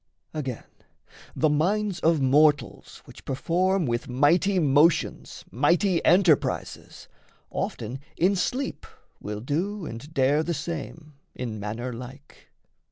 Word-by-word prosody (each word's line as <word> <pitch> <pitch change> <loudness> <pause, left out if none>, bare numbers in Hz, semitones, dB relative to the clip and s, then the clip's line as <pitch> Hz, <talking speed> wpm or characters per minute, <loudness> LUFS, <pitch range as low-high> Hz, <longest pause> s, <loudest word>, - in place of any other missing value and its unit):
Again, 135 -6 -4 0.7
the 155 - +2
minds 190 +5 0
of 160 -2 +2
mortals 145 +3 +2
which - - -14
perform 180 +6 0
With 120 -1 -2
mighty 165 +10 +3
motions 150 0 +2
mighty 170 - +2
enterprises, 175 -4 +1 0.4
Often 120 +4 -4 0.2
in 190 +4 +3
sleep 255 +9 -3 0.3
will 105 0 -6
do 175 - -2
and 135 +4 -8
dare 145 0 +2
the 170 +1 -2
same 155 0 -6 0.2
In 115 -4 -5
manner 115 +5 -4
like. 130 +4 -12
150 Hz, 110 wpm, -25 LUFS, 130-175 Hz, 0.7 s, mighty